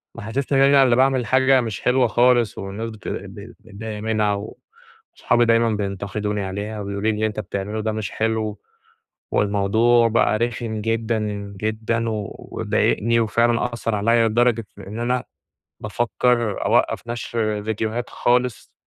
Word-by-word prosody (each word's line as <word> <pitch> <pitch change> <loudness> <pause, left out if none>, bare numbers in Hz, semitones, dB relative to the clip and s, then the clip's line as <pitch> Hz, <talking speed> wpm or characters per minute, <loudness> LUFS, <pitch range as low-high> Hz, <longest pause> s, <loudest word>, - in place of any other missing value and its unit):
محسسنى 135 +5 -1
إن - - +6
أنا 140 -1 +6
اللي 125 -2 +4
باعمل 130 -1 +2
حاجة 130 +2 +4
مش 115 -4 -4
حلوة 125 -1 +3
خالص 120 -1 +3
والناس 100 +4 -5
بت 110 -3 -11
ب 100 +1 -6 0.3
مضايقة 105 +1 -6
منها 110 -2 +1 0.8
وصحابي 120 0 +2
دايمًا 115 0 +3
بينتقدوني 105 0 -3
عليها، 100 +3 -4
وبيقولوا 100 0 -4
لي 110 - +1
اللي 110 +1 0
أنت 110 -1 -3
بتعمله 100 +2 -4
ده 110 0 -1
مش 105 -3 -4
حلو. 110 -2 -1 0.7
والموضوع 110 +4 +3
بقى 115 -1 +2
رخم 115 -1 -2
جدًا، 115 0 -1 0.4
جدًا، 110 +2 -1
وضايقني 110 +2 -1
وفعلًا 120 +2 +1
آثر 115 -2 -2
عليّّ 115 +3 +3
لدرجة 115 0 +2
إن 105 +4 -8
أنا 125 +1 0 0.6
بافكر 120 0 0
أوقّف - - +2
نشر 110 -3 -2
ڤيديوهات 110 +2 -3
خالص 125 -1 0
110 Hz, 135 wpm, -22 LUFS, 105-120 Hz, 0.8 s, إن